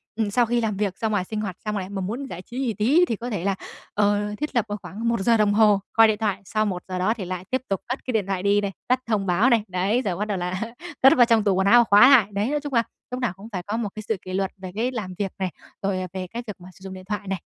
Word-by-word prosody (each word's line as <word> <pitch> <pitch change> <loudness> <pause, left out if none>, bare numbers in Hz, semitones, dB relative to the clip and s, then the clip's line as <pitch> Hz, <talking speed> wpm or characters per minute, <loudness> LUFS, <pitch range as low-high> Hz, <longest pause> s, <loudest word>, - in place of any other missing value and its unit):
ừm, 215 -2 -1
sau 240 +3 +3
khi 235 +1 0
làm 210 -3 -1
việc 200 -2 -1
ra 225 - -1
ngoài 205 -4 0
sinh 215 +2 -4
hoạt 190 -4 -5
xong 210 -1 -1
lại 190 -1 -4
mà 200 -1 -4
muốn 230 +9 -4
giải 180 - -7
trí 240 +6 -8
gì 250 -5 0
tí 270 - +4
thì 230 - -2
có 240 +4 -6
thể 205 -7 -3
là, 195 0 +1 0.4
ờ, 205 0 +1
thiết 300 -1 -4
lập 235 -3 +2
vào 205 - -3
khoảng 225 +4 -5
1 235 - 0
giờ 230 +4 +3
đồng 210 -1 +3
hồ 210 -2 +5
coi 225 0 +7
điện 215 -1 +1
thoại 210 -3 -1
sau 215 +3 0
1 180 -4 -3
giờ 185 -1 -3
đó 190 +4 +2
thì 215 -5 -6
lại 180 0 -5
tiếp 260 0 +1
tục 195 -2 -1
cất 255 +3 -4
cái 255 - -2
điện 215 -4 0
thoại 190 -2 -2
đi 205 +1 +3
này, 200 - -2 0.2
tắt 255 +1 +3
thông 215 -3 0
báo 195 +8 +3
này, 230 -3 +3
đấy, 190 +6 0
rồi 195 -8 -2
bắt 210 - -1
đầu 205 -3 -2
là 180 +2 -3 0.4
cất 265 +1 +8
vào 245 - +7
trong 230 -2 +3
tủ 200 -2 +3
quần 190 +1 +2
áo 240 +4 +7
và - - +6
khóa 225 +3 +7
lại. 250 -8 +6
Đấy, 205 +5 0
nói 295 - 0
chung 290 -2 -5
là 230 - +4 0.3
lúc 250 - -3
nào 245 -7 0
cũng 205 +4 -11
phải 185 -3 -4
có 210 +4 -3
một 225 -3 -2
cái 215 - -6
sự 220 - 0
kỷ 185 - -8
luật 195 0 -1
về 185 -1 -8
cái 235 +4 0
làm 210 -7 -5
việc 195 -2 -2
này, 185 -2 -1 0.3
rồi, 195 -1 -1
à, 185 - -4
về 185 -1 -4
cái 235 +6 -6
việc 210 - -5
mà 180 - -11
sử 190 - -19
dụng 190 -1 -7
điện 185 0 -10
thoại 210 -1 -3
này. 190 -3 -3
205 Hz, 325 wpm, -24 LUFS, 190-230 Hz, 0.4 s, cất